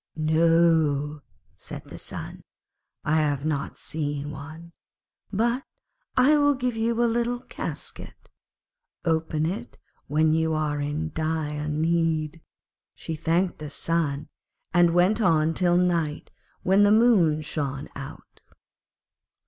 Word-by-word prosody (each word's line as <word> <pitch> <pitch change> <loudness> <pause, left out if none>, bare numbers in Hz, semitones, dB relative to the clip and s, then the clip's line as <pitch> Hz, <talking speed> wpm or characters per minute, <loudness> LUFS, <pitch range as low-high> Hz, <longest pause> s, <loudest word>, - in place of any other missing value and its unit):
'No,' 155 -2 +3 0.3
said - - -9
the - - -11
Sun, - - -7 0.6
'I 155 - +2
have 145 -2 0
not 150 -2 -2
seen 145 -1 -4
one; 155 +4 -10 0.6
but 235 +5 +1 0.5
I 265 +4 +6
will 290 0 +4
give 250 -2 -2
you 230 +1 +1
a - - +4
little 240 +1 0
casket. - - -7 0.7
Open 160 -1 0
it 210 +9 -4 0.3
when 155 +1 +3
you 160 0 +1
are 150 -1 -1
in 150 +2 -2
dire 155 -2 -2
need.' 160 0 0 0.5
She 165 - -6
thanked 165 +3 0
the 150 -1 -6
Sun, 150 -2 -1 0.5
and 175 -1 +4
went 185 +6 +3
on 165 -4 +3
till 175 0 +3
night, 170 -4 0 0.3
when 190 +2 +4
the 205 0 +6
Moon 205 -9 +4
shone 140 -2 -3
out. 135 -1 -10
160 Hz, 120 wpm, -25 LUFS, 150-180 Hz, 0.7 s, I